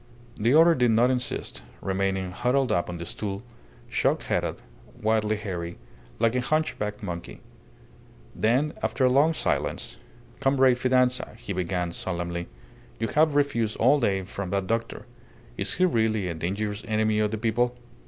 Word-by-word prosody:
The 115 +6 +2
other 165 +2 +7
did 125 -5 +2
not 115 +3 +4
insist, 125 -1 -3 0.2
remaining 95 -1 -1
huddled 125 +7 +1
up 85 - +1
on 90 - -4
the 85 - -6
stool, 100 +3 -4 0.4
shock - - +1
headed, - - -1 0.4
wildly 110 0 +1
hairy, 90 -5 -5 0.4
like 115 0 +2
a 125 - +1
hunchbacked 125 -8 -1
monkey. 85 -3 -6 1.0
Then, 130 +7 +2
after 130 - +1
a - - +5
long 145 +5 +4
silence - - -2 0.4
"Comrade 135 -2 +4
Fidanza," 125 -2 +2
he 115 -4 -5
began, 90 -1 -1
solemnly, 85 -1 -4 0.5
"you 115 - -1
have 155 -1 +3
refused 115 -7 +1
all 135 +3 +4
aid 95 -3 +1
from 100 -2 -5
that 100 0 0
doctor. 115 +3 -2 0.5
Is - - -1
he 185 - +3
really 110 - +1
a 85 - -2
dangerous 100 +5 -3
enemy 110 -1 +1
of 105 -1 +2
the 110 - -3
people?" 120 +2 0
110 Hz, 155 wpm, -26 LUFS, 95-125 Hz, 1.0 s, other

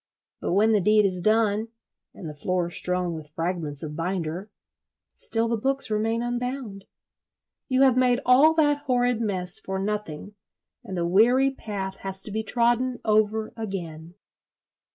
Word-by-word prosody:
But - - -2
when 215 +4 +3
the 210 -2 +3
deed 210 +2 +4
is 185 -2 -1
done, 215 +1 +1 0.5
and 170 - -9
the 155 - -7
floor 175 +3 -2
strewn 180 -1 +3
with 155 -2 -9
fragments 165 -4 -3
of 150 -1 -6
binder—still 185 +6 -4
the 230 0 -1
books 270 0 +2
remain 225 +2 0
unbound. 245 -4 -4 0.8
You 260 +1 +3
have 260 -2 +4
made 250 -1 +2
all 280 +6 +5
that 290 -2 +2
horrid 245 -2 +1
mess 190 -2 0
for 190 -3 -5
nothing, 205 -2 -4 0.5
and 190 - -7
the 170 - -1
weary 245 +9 +3
path 195 -6 -6
has 195 0 -4
to 210 - -1
be 220 +2 -2
trodden 240 +3 +1
over 215 0 +1
again. 175 -6 -7
210 Hz, 150 wpm, -25 LUFS, 180-240 Hz, 0.8 s, all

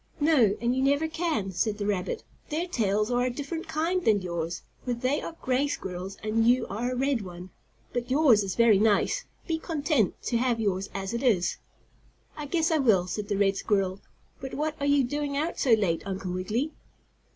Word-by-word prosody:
"No, 265 -10 +4
and 240 +2 +1
you 260 - 0
never 285 +4 +2
can," 315 - -1
said 210 +3 0
the 205 - -3
rabbit. 205 - -2 0.3
"Their 320 +4 -1
tails 210 - 0
are 245 0 +2
a 250 - +1
different 290 +7 -5
kind 330 +4 0
than 205 -4 +3
yours, 170 -1 -3 0.2
for 250 - -1
they 255 +5 0
are 330 - -6
gray 260 +2 +2
squirrels 190 -7 -5
and 225 +1 +2
you 250 +2 +4
are 235 +5 -2
a - - -2
red 265 -1 +1
one. 180 -1 -9 0.4
But 245 0 -2
yours 260 -6 +5
is 195 -2 -3
very 230 -4 +5
nice. 220 - +2 0.2
Be 325 -2 -1
content 295 - 0
to 235 - 0
have 240 -2 +1
yours 195 -3 -1
as 195 +2 -3
it 235 - -2
is." 195 -9 +2 0.8
"I 300 -1 -6
guess 325 +2 +1
I 320 - +3
will," 210 -10 +4
said 205 +3 -4
the 205 -2 -1
red 195 -1 +2
squirrel. 195 -3 0 0.4
"But 265 0 -6
what 305 +1 -1
are 285 - 0
you 285 -1 +4
doing 285 +2 -2
out 315 +4 -2
so 250 - +4
late, 195 -7 +2
Uncle 190 -1 -4
Wiggily?" 215 - -1
240 Hz, 200 wpm, -27 LUFS, 200-285 Hz, 0.8 s, yours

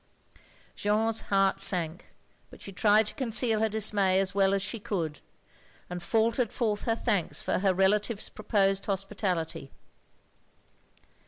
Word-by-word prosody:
Jeanne's 220 +2 +1
heart 195 -1 +2
sank, 180 -4 +1 0.4
but - - -15
she 195 - -8
tried 210 +2 +3
to - - -3
conceal 230 -4 +1
her 220 0 +1
dismay 205 -3 +2
as 195 0 -1
well 195 -1 +3
as 195 - -1
she 230 - -4
could; 165 -7 -4 0.7
and 180 0 -5
faltered 230 +5 +1
forth 215 -4 -2
her 225 - +1
thanks 210 -7 -1
for - - -1
her 195 0 +2
relative's 200 +3 +1
proposed 195 -2 0
hospitality. 190 -7 -3
200 Hz, 135 wpm, -28 LUFS, 190-220 Hz, 0.7 s, tried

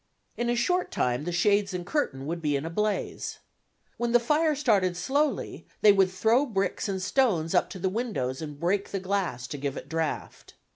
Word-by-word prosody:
In 240 0 -1
a 240 - +2
short 360 +10 +1
time 125 +4 -1
the 175 - -2
shades 200 +2 +2
and 175 -1 -4
curtain 160 - -1
would 170 +3 -3
be 150 -2 +1
in 140 +2 -2
a 165 - -4
blaze. 210 +3 -2 0.6
When 240 0 -1
the 240 - +7
fire 300 +5 +2
started 200 -10 +2
slowly, 285 +10 -1
they 210 - +8
would 195 -2 +4
throw 225 +9 +2
bricks 195 -2 -1
and 190 -1 -1
stones 185 -6 +1
up 180 - +3
to - - -7
the 185 - -1
windows 190 - -2
and 150 -2 -7
break 190 +4 0
the 195 - -2
glass 185 -10 -2
to 145 - -5
give 140 -1 -3
it - - -7
draught. 160 -1 -4
195 Hz, 200 wpm, -27 LUFS, 165-235 Hz, 0.6 s, they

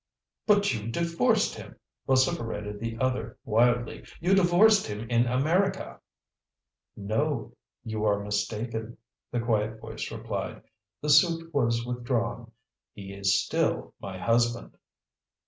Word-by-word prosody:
"But 205 -4 +4
you 110 -1 -4
divorced 165 +8 +1
him," - - -10 0.3
vociferated 115 -7 0
the 115 0 -4
other 125 -3 -1
wildly. 120 +2 +2 0.2
"You 180 +3 +2
divorced 195 +3 +5
him 105 +2 -5
in 120 +1 +3
America!" 160 +11 0 1.0
"No. 115 +6 -1 0.3
You 110 -1 -3
are 100 -1 +2
mistaken," 110 +3 -3 0.3
the 120 - -1
quiet 110 -1 0
voice - - -6
replied. - - -5 0.4
"The 150 - -2
suit 165 +2 +4
was 115 -4 +1
withdrawn. 120 -1 -2 0.4
He 100 -1 -9
is 100 -1 +2
still - - -1
my 95 -2 -7
husband." 120 +3 0
115 Hz, 115 wpm, -27 LUFS, 110-145 Hz, 1.0 s, divorced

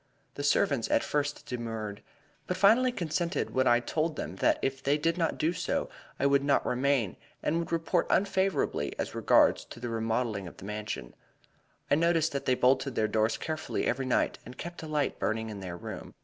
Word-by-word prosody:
The - - -5
servants 140 -3 +2
at - - +3
first 145 0 -2
demurred, 115 -4 -5 0.5
but 180 - -1
finally 225 +7 +5
consented 170 -4 -2
when 130 0 +2
I 120 0 +5
told 155 +6 -1
them 85 - -5
that - - +3
if 135 0 -1
they 140 +2 +2
did 165 +2 +1
not 165 -2 0
do 165 +3 +1
so 180 0 -1 0.3
I - - +1
would 140 0 +4
not 140 -1 +2
remain, 125 -5 +1 0.3
and 165 - +1
would 170 - -4
report 165 +1 +1
unfavorably 195 -1 +1
as - - -3
regards - - +4
the 120 0 -7
remodeling 115 -3 -1
of - - -11
the - - -10
Mansion. 105 - -5 0.8
I - - +6
noticed 165 +1 +3
that 140 - -3
they 130 - +4
bolted 130 +1 +2
their 110 - +2
doors 110 +1 +1
carefully 155 -1 -3
every 130 +1 0
night 125 - +1
and 125 - -11
kept 175 +1 -7
a 160 - -7
light 150 -2 -1
burning 110 0 -1
in 105 - -7
their 90 -2 -6
room. - - -8
135 Hz, 190 wpm, -29 LUFS, 115-165 Hz, 0.8 s, I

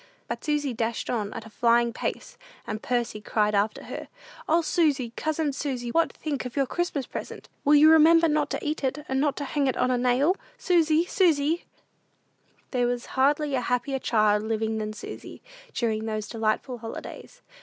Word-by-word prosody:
But - - -5
Susy 295 -3 0
dashed 230 0 -2
on 215 -4 -2
at 220 - -7
a - - -11
flying 235 +1 +3
pace, - - -4 0.3
and 215 0 -4
Percy 240 -3 -1
cried 210 0 +1
after 205 +1 0
her, - - -7 0.4
"O, 330 +2 +4
Susy, 285 -8 +1
cousin 310 -2 -1
Susy, 260 -4 -3
what 330 +3 +2
think 290 -4 -4
of 250 -1 -7
your 275 -1 +2
Christmas 315 -2 -2
present? - - -8
Will 295 +1 +5
you 305 +2 +8
remember 325 +1 +6
not 300 -1 +1
to - - -4
eat 305 0 -2
it, 275 +3 -2
and 265 0 0
not 290 -1 +1
to 285 - -3
hang 280 0 0
it 260 - 0
on 255 - +2
a 250 - +1
nail? 255 +8 +3 0.2
Susy, 335 -6 +3
Susy?" 330 -3 +2 1.1
There 245 -2 +1
was 245 0 -2
hardly 285 +2 +2
a 255 - +1
happier 250 +3 -1
child 215 -4 +2
living 220 0 -1
than 215 0 -3
Susy, - - -9 0.3
during 220 -2 -1
those 215 -1 -3
delightful 225 +2 -2
holidays. 230 - -9
260 Hz, 180 wpm, -26 LUFS, 230-300 Hz, 1.1 s, you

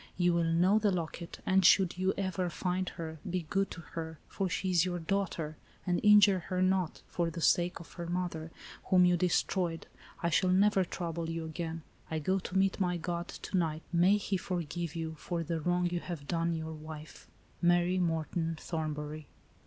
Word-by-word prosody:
You 175 -1 +3
will 170 0 +2
know 175 +6 +4
the 210 -1 +2
locket, 170 -2 -4
and 190 0 +4
should 185 0 +5
you 185 +1 +1
ever 185 -2 -1
find 180 +1 -1
her, 160 -2 -7
be 180 -1 -2
good 195 0 +1
to 170 - -8
her, 160 -1 -5
for 195 -2 -2
she 185 +2 -1
is 175 -2 +4
your 180 -1 -1
daughter, 165 -3 -2
— - - -30
and 175 -2 +1
injure 205 -2 +7
her 185 - -1
not, 185 -2 +1
for 170 -1 -1
the 165 - -6
sake 175 +2 +2
of 170 - -12
her 170 -1 -6
mother, 175 -2 -3 0.4
whom 185 -1 +5
you 180 0 +4
de 180 +1 +2
stroyed. 175 -1 0 0.4
I 170 - +1
shall 185 +3 +3
never 195 +1 +4
trouble 170 -2 -4
you 165 0 -3
again.. 160 0 -5 0.3
I 160 - -1
go 185 +6 +1
to 185 0 -3
meet 195 +1 +2
my 180 -2 +1
God, 170 +1 -3
to* - - -6
night. 160 -3 0
May 180 +4 +5
He 200 -1 -1
forgive 175 -2 -3
you 160 -1 -3
for 170 -2 -3
the 165 0 -2
wrong 175 +2 +1
you 175 0 -1
have 165 -5 -7
done 170 0 0
your 160 0 -4
wife. 155 0 -10 0.3
"Mary 175 +1 +3
Morton 165 -1 -1
Thornbury." 155 -2 -4
175 Hz, 195 wpm, -31 LUFS, 165-185 Hz, 0.4 s, injure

